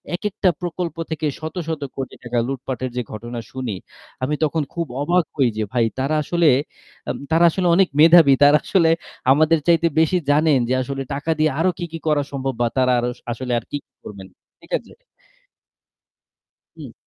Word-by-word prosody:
একেকটা 195 -1 0
প্রকল্প 175 0 -4 0.2
থেকে 160 0 -2
শত, 160 +1 -6
শত 160 -3 -3 0.2
কোটি 130 -2 -5
টাকা 120 0 -3
লুটপাটের 130 -1 -4
যে - - +1
ঘটনা 120 +2 -6
শুনি, 130 -6 -4 0.5
আমি 150 +3 0
তখন 155 +1 +1
খুব 170 -1 -2 0.2
অবাক 175 +2 +2
হই 135 -5 +3
যে 110 - 0
ভাই 120 -2 +2
তারা 140 +4 0
আসলে 170 0 +2 0.6
অ্যাম - - -3 0.2
তারা 165 +2 +5
আসলে 180 +1 -1
অনেক 190 -1 +4
মেধাবী। 165 -3 +7
তারা 145 +1 +7
আসলে 170 -4 +3 0.4
আমাদের 155 +3 +4
চাইতে 170 0 +4
বেশি 160 +3 +3
জানেন 150 -2 +3
যে - - +2
আসলে 135 +1 -4
টাকা 145 +4 -2
দিয়ে 155 -1 +3
আরো 185 +3 +3
কি, 175 - -4
কি 165 - -6
করা 150 -2 +2
সম্ভব 135 -1 -3
বা 120 - +3
তারা 130 -1 +3
আরস 120 +1 -3
আসলে 125 +1 -4
আর - - -16
কি, 145 - -1
কি - - -69
করবেন। 95 -2 -10 0.3
ঠিক - - -19
আছে? - - -18 1.8
হুম - - -10
150 Hz, 180 wpm, -21 LUFS, 130-165 Hz, 1.8 s, মেধাবী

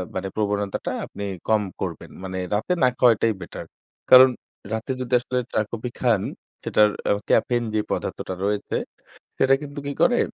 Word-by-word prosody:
মানে 95 +1 -2
প্রবণতাটা 105 -2 -1
আপনি 100 - -8 0.3
কম 110 -1 +4 0.2
করবেন। - - -5
মানে 95 0 -5 0.2
রাতে 110 - +1
না - - +7
খাওয়াটাই 115 -2 +4
বেটার। 85 - -7 0.4
কারণ 130 0 +10 0.4
রাতে 110 +4 -3
যদি 125 0 -4
আসলে 125 +1 -3 0.2
চা - - +2
কফি 115 +1 -4
খান 115 -6 +3 0.4
সেটার 105 0 +4 0.2
আ - - +5 0.2
ক্যাফেইন 120 +1 +3
যে 110 - +2
পদার্থটা - - -3
রয়েছে 105 0 -1 0.6
সেটা 135 - +4
কিন্তু 145 0 -7
কি 140 - -2
করে? 245 -1 +4
110 Hz, 155 wpm, -24 LUFS, 105-125 Hz, 0.6 s, কারণ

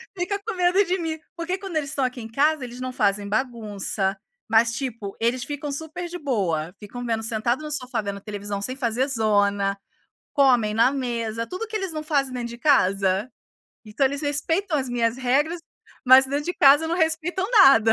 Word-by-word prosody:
Fica 385 +3 -2
com 455 - -2
medo 365 +2 +3
de 365 +2 0
mim. 320 -1 -3 0.2
Porque 350 +2 -3
quando 380 -3 -7
eles 285 -2 -2
estão 275 -3 0
aqui 250 -1 -4
em 225 - -7
casa 290 +3 +1
eles 245 0 -8
não 255 0 -4
fazem 200 -1 +1
bagunça, 210 -4 -2 0.3
mas 225 +1 +3
tipo, 225 -5 -5
eles 240 +2 0
ficam 290 0 -5
super 320 +4 -5
de 355 +1 -6
boa. 180 - -1
Ficam 245 +4 -8
vendo 225 -1 -1
sentado 230 +4 0
no 300 - -6
sofá, 250 -5 -2
vendo 200 -1 -5
televisão 205 -1 -5
sem 255 +5 -3
fazer 250 0 0
zona, 205 -4 +1 0.6
comem 245 -7 +3
na 230 +4 +4
mesa, 230 -4 -3
tudo 365 +5 -5
o - - -5
que 440 - -7
eles 380 -5 -4
não 310 - -4
fazem 280 -4 0
dentro 240 -2 -4
de 235 - -8
casa. 195 -3 +2 0.5
Então 215 +6 -1
eles 280 +1 -3
respeitam 310 +4 0
as 265 -2 -2
minhas 235 -1 0
regras, 290 +7 +1 0.4
mas 260 +1 +8
dentro 285 +2 -2
de 360 - -3
casa 290 +4 +5
não 340 - 0
respeitam 340 +4 0
nada. 270 - +7
255 Hz, 195 wpm, -24 LUFS, 220-310 Hz, 0.6 s, mas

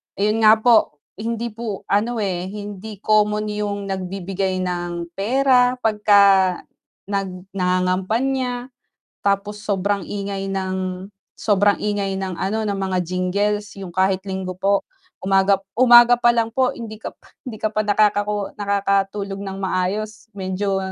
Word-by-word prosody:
ayun 210 +2 +1
nga 215 0 +7
po 230 -10 +4 0.2
hindi 230 +1 -3
po 215 -3 -6
ano, 220 +2 +1
eh, 180 -2 -2
hindi 205 +1 -8
common 210 0 +2
yung 205 -1 -3
nagbibigay 190 0 -3
ng 175 -1 -4
pera 250 +5 +3
'pagka 200 -5 +4 0.6
nag 190 -1 -4
nangangampanya, 220 +8 -1 0.6
tapos 200 +1 0
sobrang 200 -2 0
ingay 195 -1 -4
ng 190 0 -3 0.3
sobrang 205 -1 +2
ingay 205 -2 -1
ng 190 -1 -3
ano 215 +3 -1
ng 200 -2 -2
mga 190 -1 -1
jingles 200 +4 -1
yung 190 -3 -7
kahit 190 +1 +1
linggo 190 -1 -4
po, 200 +1 +2 0.4
umaga 195 0 +3 0.2
umaga 240 0 +8
pa 240 0 +4
lang 230 -1 +1
po 260 0 +2
hindi 220 -2 -8
ka - - -4 0.3
hindi 230 -5 -7
ka 215 - +1
pa 215 - +2
nakakahu 205 -1 +1
nakakatulog 200 0 -1
nang 195 0 -6
maayos, 210 +4 -2
medyo 195 0 -2
200 Hz, 130 wpm, -21 LUFS, 190-215 Hz, 0.6 s, umaga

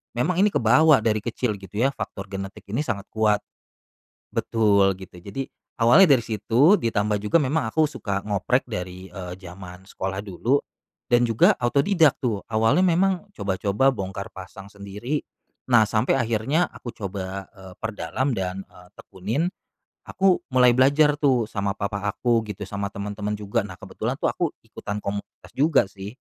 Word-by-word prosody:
memang 165 +9 0
ini 205 - +5
kebawa 130 - +4
dari 110 -2 +2
kecil 110 -1 -3
gitu 95 0 -13
ya, 130 +6 +2
faktor 100 -7 -6
genetik 95 0 -6
ini 115 - -1
sangat 110 -9 -2
kuat. 105 -2 +2 0.9
Betul 100 -3 +3
gitu 95 -2 -12
jadi 105 +8 -5 0.3
awalnya 130 +10 +6
dari - - -5
situ, 115 - +4
ditambah 105 -2 0
juga 105 +10 +2
memang 150 +1 0
aku 160 -1 +3
suka 100 -9 -3
ngoprek 105 +5 +1
dari, 95 -4 -6
eee, 90 -3 -6
jaman 90 0 -11
sekolah 95 -1 -4
dulu, 115 +9 +1 0.5
dan 120 0 +4
juga 115 -1 +4
otodidak 145 +5 +3
tuh. 115 -5 0
Awalnya 110 +12 +3
memang 180 +1 +2
coba-coba 100 +5 +1
bongkar 100 -4 -5
pasang 95 +1 -11
sendiri, 105 +8 -4 0.5
nah 120 -3 +5
sampe 110 +3 +1
akhirnya 120 +8 +1
aku - - -10
coba, 95 -1 -6
eeee, 95 -3 -13
perdalam 115 +5 -2
dan, 95 -3 -3
eee, 90 0 -18
tekunin. 105 - -3 0.6
Aku 190 -2 +2
mulai 125 -1 +6
belajar 145 +4 +4
tuh 125 -7 +2
sama 100 -1 -2
papa 100 0 -4
aku 115 +2 +1
gitu, 105 -2 -8
sama 100 0 -3
temen-temen 105 +1 -4
juga, 105 -1 -2
nah - - -8
kebetulan - - -4
tuh - - +2
aku - - -1 0.2
ikutan 105 0 -6
komunitas 100 0 -6
juga 145 -8 +3
sih. 100 +2 -9
110 Hz, 155 wpm, -24 LUFS, 100-130 Hz, 0.9 s, awalnya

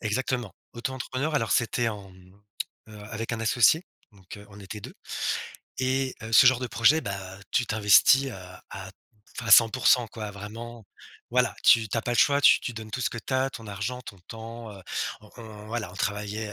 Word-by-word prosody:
Exactement. 120 0 -2 0.2
Auto-entrepreneur, 130 +4 -4
alors 115 -6 0
c'était 115 0 +1
en 100 -4 -8 0.8
heu, 110 -1 -12
avec 115 +1 -4
un 115 - -3
associé, 120 - +3 0.3
donc, 95 -1 -13
heu, 100 - -12
on 100 +1 -13
était 100 +2 -8
2. - - -10 0.8
Et, 130 0 0
heu, 110 +1 -7
ce 120 - +8
genre 125 -1 +5
de 125 - -2
projet, 120 +7 +3
bah, 95 -4 -6
tu 125 - +1
t'investis 110 +6 +5
à 90 -4 -11
à 95 0 -8 0.5
enfin, 115 - -4
100% 115 +2 +6
quoi, 105 -1 -7
vraiment 110 +3 -9 0.5
voilà, - - +1
tu 115 -2 +6
tu 100 - -3
as 115 - 0
pas 120 - -2
le - - 0
choix, 140 +2 +4
tu - - +6
tu 120 - -4
donnes 110 -1 -9
tout 130 - -3
ce - - 0
que 115 - -6
tu 130 +3 -5
as, 130 +1 +1
ton 115 -3 -10
argent, 105 +5 -4
ton 100 -5 -11
temps, 115 0 -8
heu, 100 - -12 0.4
on 105 - -17
on, 110 -2 -11
voilà, 110 -4 -4
on 90 - -14
travaillait, 105 +1 -3
115 Hz, 195 wpm, -26 LUFS, 105-125 Hz, 0.8 s, ce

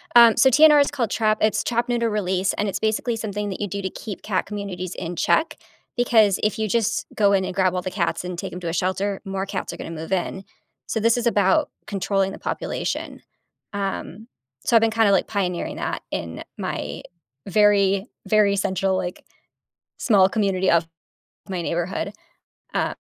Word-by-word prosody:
Um, 235 -2 +8
so, 265 - +6
TNR 300 +3 +7
is 285 - +2
called 250 -7 -1
trap 215 -1 +2
it's 215 -1 +2
trap, 240 0 -1
neuter, 235 -1 +1
release, 190 -2 0
and 210 - -1
it's 195 0 -3
basically 220 +2 0
something 210 -1 -3
that 190 - -5
you 205 - -2
do 200 +1 -4
to 190 - -2
keep 205 +1 -8
cat 195 -3 -1
communities 195 -3 -5
in 175 0 -5
check. 320 - +1 0.4
Because 220 -5 +4
if 215 +2 +1
you 220 -1 -1
just 230 +1 0
go 200 -2 +3
in 190 -1 +2
and - - -4
grab 185 -1 +2
all 180 - -1
the 185 - -4
cats 180 -2 -1
and 180 -1 -5
take - - -5
'em 180 - -6
to 170 - -3
a - - -3
shelter, 190 +2 -1
more 195 0 -3
cats 195 -1 -4
are - - -8
gonna - - -7
move 160 +2 -7
in. 190 +1 -2 0.4
So, 225 - -1
this 230 +2 +3
is 240 - 0
about 200 -4 +3 0.2
controlling 195 -1 0
the - - -9
population. - - -4 0.5
Um, 200 +1 -4 0.4
so, 235 - +3
I've - - +7
been 225 - +3
kinda, 220 -2 +3
like, - - +2
pioneering 185 -4 -2
that - - -3
in 85 -2 -4 0.2
my - - -4 0.4
very, 200 0 +3 0.2
very 210 -2 +3
central, 190 -1 0
like, 180 -1 -4 0.7
small 195 -5 +4
community 195 -3 +1
of 170 -1 +3 0.6
my 185 -2 -2
neighborhood, 175 +4 -2 0.6
uh - - 0
200 Hz, 190 wpm, -23 LUFS, 185-220 Hz, 0.7 s, Um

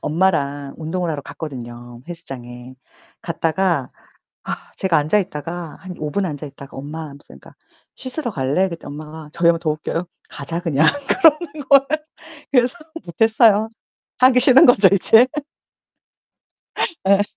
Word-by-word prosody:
엄마랑 145 -4 0
운동을 165 +2 -3
하러 145 -2 -3
갔거든요, 120 -5 -9
헬스장에. 125 -6 -9 0.5
갔다가 165 -5 -1 0.5
아 - - -6
제가 185 -5 +2
앉아 155 +8 +2
있다가 170 -2 -5
한 185 -1 -9
5 150 -1 -4
분 195 +4 -1
앉아 150 -1 -6
있다가 140 -1 -12
"엄마." 145 +4 -7
하면서 145 -1 -12
그러니까 - - -16 0.4
"씻으러 255 -1 -5
갈래?" 145 +7 0
그랬더니 165 -4 -8
엄마가 155 0 -10
저희 170 0 +2
엄마 170 - +3
더 160 -2 -2
웃겨요. 165 +3 -3 0.2
"가자, 165 +4 -5
그냥." 160 -2 +2 0.2
그러는 310 -4 +2
거예요. 275 0 +6 0.6
그래서 250 0 +3 0.3
못 170 - -10
했어요. 220 -1 +4 0.5
하기 255 0 +5
싫은 260 +1 +7
거죠 210 -6 +6
이제. 225 +5 +6 1.8
예. 200 +1 +5
165 Hz, 310 characters per minute, -20 LUFS, 145-200 Hz, 1.8 s, 싫은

